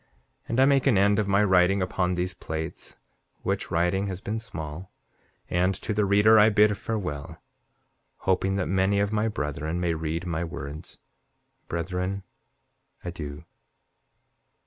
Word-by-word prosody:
And 115 - 0
I 135 - +7
make 140 -1 +3
an 120 -7 +4
end 100 +1 +4
of 105 - 0
my 100 +1 +3
writing 95 0 +4
upon 90 -1 0
these 90 +1 -2
plates, 80 -2 -6 0.5
which - - -1
writing 90 +4 +1
has 95 -2 -4
been 105 +3 -3
small; 80 -4 -7 0.6
and 90 +2 +1
to 105 - -3
the 105 0 +2
reader 105 +3 +6
I 105 +1 +7
bid 105 0 +4
farewell, 90 -11 -4 0.8
hoping 95 +1 +1
that 95 - 0
many 95 +1 +2
of 100 +1 0
my 110 +1 +1
brethren 75 -3 -3
may 85 -2 0
read 80 +2 -3
my 85 -1 -2
words. 75 -2 -7 0.7
Brethren, 90 +3 -3 0.8
adieu. 75 -5 -6
95 Hz, 145 wpm, -26 LUFS, 85-100 Hz, 0.8 s, I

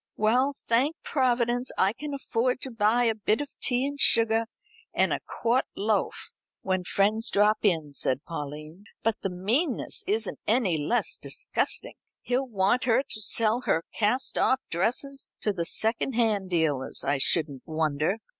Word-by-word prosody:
"Well, 245 +6 +3
thank 260 +7 +1
Providence, 245 -2 0
I 195 +2 +3
can 290 +3 -6
afford 255 -1 -1
to 265 - -4
buy 225 +2 +2
a 230 -2 +2
bit 215 0 0
of 290 -1 -4
tea 250 +1 +2
and 285 0 -4
sugar 225 -2 +3 0.5
and - - +2
a - - -1
quart 235 +3 0
loaf 210 +1 -1 0.3
when 185 -1 0
a - - -14
friend 205 +4 +2
drops 210 +1 +3
in," 160 -8 +1
said 130 0 0
Pauline, 155 +3 -7 0.2
"but 225 -1 0
the 195 - -2
meanness 225 - -1
isn't 215 +2 -1
any 210 -8 +2
less 235 +12 0
disgusting. - - -2 0.3
He'll 255 +2 -1
want 205 +2 +1
her 250 +2 +3
to 215 - -4
sell 225 +3 +2
her 165 - +2
cast 230 +5 +1
off 260 - +3
dresses 255 - -2
to 210 - 0
the 170 -3 -2
secondhand 225 -2 +1
dealers, 155 -6 0
I 140 -1 0
shouldn't 145 -2 +2
wonder." 155 +3 0
220 Hz, 155 wpm, -27 LUFS, 180-245 Hz, 0.5 s, Well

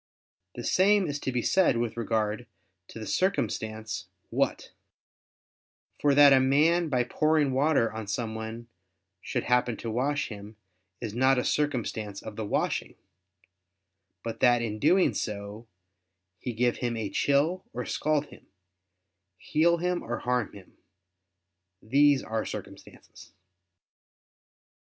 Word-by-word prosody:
The - - -6
same 200 +1 +3
is 145 -2 -3
to 130 - -3
be 125 -2 -1
said 190 -10 +3
with 115 -1 -2
regard 110 0 -1 0.4
to - - -11
the 110 - -6
circumstance 110 - -2 0.2
"what"; - - -1 1.3
for 145 -1 +3
that 145 -1 +8
a 135 - +6
man 155 +6 +3
by 125 -3 +2
pouring 155 +2 +1
water 135 -4 +2
on 110 -1 -6
someone 110 +2 -4 0.5
should - - -3
happen 125 -2 +1
to 115 - -5
wash 140 +5 -1
him, 105 0 -9 0.5
is 110 -4 -4
not 130 +3 +3
a 125 - 0
circumstance 115 -8 -2
of 110 - -8
the 110 - -4
washing; - - -1 1.3
but 115 -1 -5
that 120 -2 +4
in 110 -2 -4
doing 180 - +4
so 105 +1 -5 0.7
he 125 - -4
give 120 +1 0
him 120 -2 -2
a 110 -2 -2
chill, 150 +6 +1
or 125 - -5
scald 150 -1 0
him; - - -17 0.9
heal 170 - +2
him 180 +1 -1
or 120 +1 -4
harm 125 -3 -1
him, 100 -2 -15 1.0
these 140 +5 +3
are 110 0 -2
circumstances. - - -10
125 Hz, 130 wpm, -28 LUFS, 110-145 Hz, 1.3 s, that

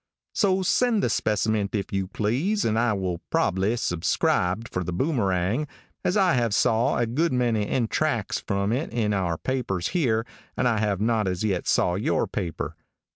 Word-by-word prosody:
"So 190 -3 +2
send 225 +2 +2
the - - +1
speciment 105 -1 0
if 100 -2 -3
you 95 -1 -1
please 135 - 0
and 110 0 +1
I 120 -2 +2
will 95 -4 -2
probbly 95 +4 +1
suscribe 90 +3 0
for 90 - -3
The 90 - -4
Boomerang, 100 - 0 0.4
as 180 - +1
I 190 -3 +4
have 120 -4 +1
saw 115 +2 +2
a 120 - +2
good 150 +9 0
many 120 -5 +1
extrax 120 -4 0
from 100 +1 -1
it 135 +7 -1
in 110 -3 0
our 90 -4 0
papers 110 -9 -2
here 115 -10 +1 0.3
and 125 - +2
I 115 -3 +1
have 105 -2 0
not 110 -2 +1
as 90 +1 -2
yet 95 -5 -1
saw 90 - +2
your 95 +4 0
paper." 80 -2 -4
110 Hz, 175 wpm, -25 LUFS, 95-125 Hz, 0.4 s, I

